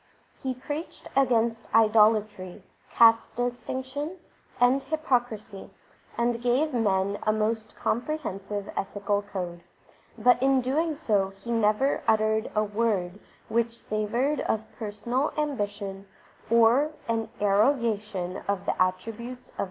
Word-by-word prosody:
He 260 Hz, -1 st, -2 dB
preached 290 Hz, +6 st, -6 dB
against 235 Hz, -3 st, +2 dB
idolatry, 215 Hz, -4 st, +3 dB, 0.3 s
caste 230 Hz, -1 st, +5 dB
distinction, 260 Hz, +6 st, -3 dB, 0.4 s
and 250 Hz, +3 st, +4 dB
hypocrisy, 245 Hz, -10 st, -2 dB, 0.5 s
and 235 Hz, 0 st, 0 dB
gave 260 Hz, +5 st, +1 dB
men 200 Hz, -3 st, +1 dB
a 215 Hz, -, +2 dB
most 220 Hz, +1 st, -1 dB
comprehensive 210 Hz, -7 st, -3 dB
ethical 205 Hz, +1 st, -1 dB
code; 180 Hz, -4 st, -6 dB, 0.6 s
but 245 Hz, 0 st, +4 dB
in 265 Hz, -1 st, +3 dB, 0.3 s
so 285 Hz, -8 st, 0 dB
doing 195 Hz, 0 st, -2 dB
he 215 Hz, +5 st, -7 dB
never 225 Hz, +4 st, +2 dB
uttered 220 Hz, 0 st, +2 dB
a 215 Hz, -, +3 dB
word 205 Hz, -3 st, -1 dB, 0.3 s
which 235 Hz, 0 st, 0 dB
savoured 235 Hz, +8 st, -1 dB
of 220 Hz, 0 st, -1 dB, 0.2 s
personal 230 Hz, +6 st, -2 dB
ambition 205 Hz, -9 st, -3 dB, 0.4 s
or 235 Hz, +7 st, +4 dB
an 225 Hz, -1 st, -1 dB
arrogation 210 Hz, -3 st, +1 dB
of 200 Hz, -1 st, -1 dB
the -, -, +2 dB
attribuies_.oi 225 Hz, +7 st, -3 dB
225 Hz, 110 wpm, -27 LUFS, 205-245 Hz, 0.6 s, caste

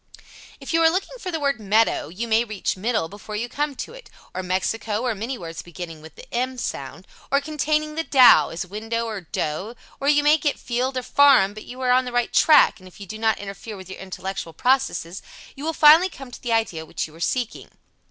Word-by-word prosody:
If -, -, -6 dB
you 330 Hz, -, +3 dB
are 325 Hz, -, +6 dB
looking 390 Hz, +8 st, -3 dB
for 375 Hz, -, -5 dB
the 325 Hz, -2 st, -2 dB
word 280 Hz, -4 st, 0 dB
"meadow" 215 Hz, -4 st, +2 dB
you 195 Hz, +9 st, -5 dB
may 225 Hz, +1 st, +3 dB
reach 215 Hz, -4 st, -3 dB
"middle" 215 Hz, -2 st, -1 dB
before 205 Hz, +3 st, -9 dB
you 230 Hz, +3 st, -2 dB
come 290 Hz, +3 st, -2 dB
to 455 Hz, -, -7 dB
it, -, -, -13 dB, 0.2 s
or 185 Hz, -, -3 dB
"Mexico," 210 Hz, +4 st, -2 dB
or 245 Hz, -2 st, 0 dB
many, 230 Hz, +5 st, -4 dB
words 165 Hz, -5 st, -7 dB
beginning 175 Hz, -2 st, -9 dB
with 160 Hz, -1 st, -13 dB
the -, -, -12 dB
"m" 255 Hz, +2 st, -1 dB
sound, -, -, -5 dB, 0.3 s
or 280 Hz, -, +4 dB
containing 305 Hz, +1 st, -1 dB
the 325 Hz, +1 st, -2 dB
"dow", 260 Hz, -5 st, +6 dB
as 175 Hz, +3 st, -5 dB
window, 225 Hz, +4 st, -3 dB
or 215 Hz, -3 st, -5 dB
"dough," 175 Hz, +6 st, -4 dB, 0.2 s
or 275 Hz, -, -3 dB
you 290 Hz, 0 st, +4 dB
may 300 Hz, +2 st, +5 dB
get 290 Hz, -1 st, 0 dB
"field" 255 Hz, +2 st, -2 dB
or 255 Hz, -, -2 dB
"farm" 265 Hz, -10 st, +5 dB
but 215 Hz, -, -10 dB
you 250 Hz, -, -10 dB
are 250 Hz, -1 st, +2 dB
on 255 Hz, +1 st, +4 dB
the 250 Hz, -, -5 dB
right 245 Hz, 0 st, 0 dB
track, 305 Hz, -7 st, +5 dB
and 185 Hz, -, -14 dB
if 185 Hz, -, -16 dB
you 200 Hz, -, -8 dB
do 215 Hz, +4 st, -8 dB
not 220 Hz, -1 st, +2 dB
interfere 205 Hz, +2 st, -8 dB
with 190 Hz, 0 st, -11 dB
your -, -, -8 dB
intellectual 190 Hz, -2 st, -6 dB
process 250 Hz, -9 st, 0 dB, 0.3 s
you 275 Hz, -, -9 dB
will 320 Hz, -, 0 dB
finally 320 Hz, +4 st, +7 dB
come 270 Hz, -7 st, -11 dB
to -, -, -11 dB
the 240 Hz, -, -3 dB
idea 220 Hz, -8 st, 0 dB
which 160 Hz, -, -4 dB
you 155 Hz, -, -13 dB
are 165 Hz, -, -14 dB
seeking. 240 Hz, +6 st, -2 dB
230 Hz, 230 wpm, -23 LUFS, 195-280 Hz, 0.3 s, finally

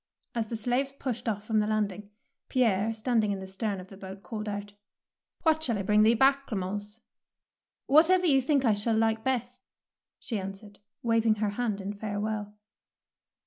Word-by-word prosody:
As 230 Hz, -2 st, -1 dB
the 230 Hz, -, -4 dB
slaves 245 Hz, +5 st, 0 dB
pushed 245 Hz, -4 st, -3 dB
off 205 Hz, -1 st, -3 dB
from 215 Hz, 0 st, +1 dB
the 210 Hz, -, +1 dB
landing, 210 Hz, -2 st, -1 dB, 0.4 s
Pierre, 225 Hz, -4 st, +2 dB
standing 220 Hz, -1 st, +1 dB
in 195 Hz, -, -2 dB
the 190 Hz, -, -6 dB
stem 195 Hz, +1 st, -3 dB
of 185 Hz, +1 st, -11 dB
the 195 Hz, -, -12 dB
boat, 190 Hz, 0 st, -9 dB
called 215 Hz, -2 st, -5 dB
out, 205 Hz, 0 st, -5 dB, 0.3 s
— -, -, -47 dB
What 315 Hz, -2 st, +3 dB
shall 235 Hz, -8 st, 0 dB
I 195 Hz, -, -2 dB
bring 210 Hz, +2 st, +4 dB
thee 225 Hz, +2 st, +5 dB
back, 275 Hz, +3 st, +3 dB
Clemence? 205 Hz, +1 st, -4 dB, 0.8 s
"Whatever 345 Hz, +6 st, +5 dB
you 275 Hz, -5 st, +5 dB
think 275 Hz, 0 st, +2 dB
I 225 Hz, -, +5 dB
shall 210 Hz, +2 st, +1 dB
like 220 Hz, 0 st, +1 dB
best," 250 Hz, -1 st, -2 dB, 0.6 s
she 225 Hz, -5 st, -3 dB
answered, 195 Hz, +2 st, -8 dB, 0.2 s
waving 230 Hz, -2 st, +3 dB
her 210 Hz, -1 st, 0 dB
hand 215 Hz, -2 st, -2 dB
in 200 Hz, +2 st, -4 dB
farewell. 210 Hz, 0 st, -3 dB
215 Hz, 180 wpm, -28 LUFS, 205-245 Hz, 0.8 s, thee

